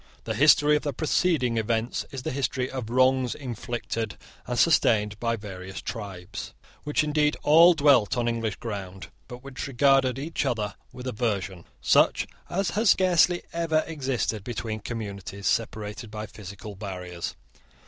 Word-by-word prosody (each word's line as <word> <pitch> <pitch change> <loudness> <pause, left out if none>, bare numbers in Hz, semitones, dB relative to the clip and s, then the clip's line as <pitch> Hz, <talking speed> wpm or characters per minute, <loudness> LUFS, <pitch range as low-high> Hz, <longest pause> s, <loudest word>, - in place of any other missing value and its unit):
The 110 - -3
history 145 +4 +5
of 150 - +1
the 145 - -3
preceding 150 -4 +1
events 115 +2 -1
is 130 -2 -7
the - - -2
history 130 -1 -1
of 125 -4 -5
wrongs 130 0 +3
inflicted 120 -4 -4 0.3
and 125 - -2
sustained 105 -10 +3
by 115 -1 0
various 95 -3 -8
tribes, 95 -1 -7 0.3
which 150 +1 +1
indeed 150 0 +1
all 165 +4 +7
dwelt 135 -9 +4
on 120 -1 0
English 115 -3 -1
ground, 95 -4 -6 0.2
but 125 +1 -10
which 135 0 -6
regarded 135 -1 +3
each 150 +4 -2
other 110 -6 -1 0.2
with 125 0 -9
aversion 100 -8 -2 0.2
such - - +4 0.2
as 190 +1 0
has 215 0 +2
scarcely 180 -1 +4
ever 165 -2 +1
existed 130 -8 -2
between 110 -2 -4
communities 100 -3 -6
separated 110 0 -2
by 105 0 -5
physical 105 0 -9
barriers. 90 -3 -6
120 Hz, 145 wpm, -26 LUFS, 105-140 Hz, 0.3 s, all